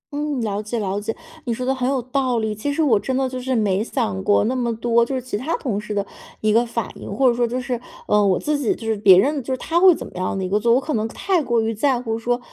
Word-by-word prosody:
嗯， 295 -3 -2
了 210 -2 -2
解 215 +3 -4
了 200 -2 -1
解， 225 +2 -3 0.3
你 240 - -1
说 250 - -4
的 265 - +1
很 255 -1 -1
有 270 -1 +1
道 255 0 -1
理。 220 -1 -1
其 215 +8 -3
实 315 +2 +1
我 225 -8 +4
真 260 +3 -2
的 265 0 +1
就 255 0 -5
是 260 +1 -1
没 210 -2 +1
想 95 - -2
过 100 - +3
那 255 - 0
么 240 -2 0
多， 235 +1 +2
就 265 +3 -2
是 260 - 0
其 255 -3 -5
他 290 +10 -2
同 210 -7 -2
事 210 - -9
的 200 -1 -1 0.3
一 215 -1 +1
个 230 +2 +4
反 230 -3 -3
应， - - -7
或 260 +6 +2
者 240 - +4
说 240 0 +1
就 250 +2 -2
是 250 -2 -3 0.3
呃， 210 0 +4
我 190 -2 +3
自 295 -1 -1
己 245 - +1
就 225 - -10
是 220 -1 +1
别 200 -3 +7
人 280 +8 +2
就 265 - -6
是 260 - 0
他 330 +6 0
会 365 -2 +7
怎 - - -7
么 - - -12
样 185 +1 -2
的 190 - -2
一 - - -2
个 205 +2 +2
做 235 +2 +2
我 - - +4
可 300 +3 -4
能 220 -2 0
太 365 - 0
过 235 -5 +1
于 225 0 -1
在 255 +2 +1
乎 225 -2 -3
说， 245 +1 0
235 Hz, 330 characters per minute, -21 LUFS, 215-260 Hz, 0.3 s, 别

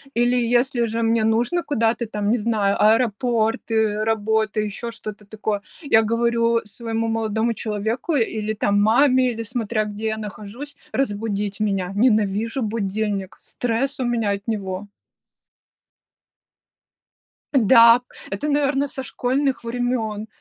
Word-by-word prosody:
Или 240 +1 +3
если 240 +1 +2
же 230 +1 -2
мне 225 0 +2
нужно 240 +10 +1
куда-то 235 -6 0
там, 210 -1 -2
не 245 - +3
знаю, 210 -3 +1
аэропорты, 220 -1 +1
работы, 220 0 0
еще 215 +3 -4
что-то 215 -2 -8
такое, 210 -1 -3 0.2
я 275 -7 +4
говорю 230 +1 +1
своему 225 +1 -3
молодому 225 +1 0
человеку 220 +9 -2
или 220 -3 -1
там 205 -1 +1
маме, 255 +3 +4
или 230 0 -5
смотря 220 -1 -2
где 210 +1 -6
я 220 0 -1
нахожусь, 215 +7 -8 0.2
разбудить 205 -5 -2
меня. 195 -3 -1
Ненавижу 220 +1 +1
будильник, 205 -2 -2
стресс 250 +4 -2
у 255 - 0
меня 230 -4 0
от 200 +2 -4
него. 200 -2 -3 2.7
Да, 235 -1 +7 0.3
это, 200 +10 -3
наверно, 285 -1 +1
со 265 - -6
школьных 260 +1 -1
времен. 230 -3 -2
225 Hz, 125 wpm, -22 LUFS, 210-240 Hz, 2.7 s, Да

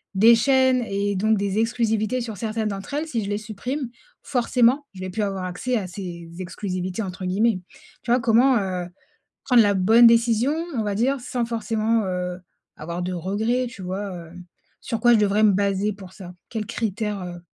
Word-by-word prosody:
des 225 +4 +7
chaînes 260 +1 +3
et 200 0 -1
donc 215 +3 +2
des 200 0 -1
exclusivités 225 0 0
sur 225 -3 -6
certaines 220 +1 -2
d'entre 200 +6 -6
elles 305 +2 -2
si 230 -8 -2
je - - -4
les 205 - -1
supprime 235 +5 -4 0.3
forcément 250 +2 +2
je 190 - -11
vais 185 - -4
plus 210 +3 -1
avoir 195 -2 -2
accès 195 +8 -2
à 195 -4 -3
ces 175 -3 -7
exclusivités 185 +1 -4
entre 185 -1 -6
guillemets. 200 +2 +1 0.4
Tu 235 - -2
vois? 245 - +4
Comment, 240 +3 +4
heu, 185 -3 -3 0.6
prendre 250 -3 +6
la 205 -1 +2
bonne 225 +6 +6
décision 235 +3 +3 0.2
on - - +1
va 205 -1 -2
dire 260 +6 +1
sans 245 -1 -2
forcément, 225 -1 0
heu, 180 -1 -3 0.4
avoir 170 +3 -5
de 180 +1 -3
regrets? 215 +8 -1
Tu 215 - -11
vois? 195 +2 -4
Heu, 170 -2 -10 0.5
sur 230 -3 -3
quoi 240 0 +6
je 225 - +5
devrais 210 +1 +2
me 215 - +6
baser 200 +1 0
pour 190 -2 -12
ça, 180 -3 -10 0.2
quels 220 -3 -3
critères, 210 -2 -2
heu? 175 -1 -7
210 Hz, 190 wpm, -23 LUFS, 190-235 Hz, 0.6 s, des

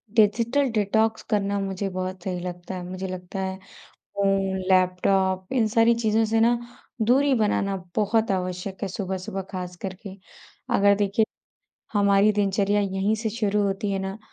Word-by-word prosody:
Digital 230 +6 +3
detox 220 +1 +1
करना 200 -2 +1
मुझे 195 0 -3
बहुत 185 0 -5
सही 180 -2 -3
लगता 175 +1 -6
है। 180 - -5
मुझे 185 +1 -5
लगता 185 +1 -6
है 190 0 -3 0.4
फ़ोन, 195 -1 -1
लैपटॉप 185 0 +2
इन 245 -4 +2
सारी 230 +2 +4
चीज़ों 225 -1 +1
से 225 +1 +1
न 240 +1 +3 0.4
दूरी 270 +5 +3
बनाना 205 -3 +1 0.2
बहुत 220 +1 +2
आवश्यक 185 0 -3
है 200 - -1
सुबह-सुबह 190 +1 -4
ख़ास 180 -1 -5
करके। 195 0 -7 0.6
अगर 200 0 +5
देखिए 205 +2 +2 0.7
हमारी 200 0 +4
दिनचर्या 205 0 +1
यहीं 195 +1 0
से 220 0 -2
शुरू 210 -2 0
होती 200 +1 -1
है 195 - 0
ना 190 +2 -4
200 Hz, 150 wpm, -25 LUFS, 190-215 Hz, 0.7 s, अगर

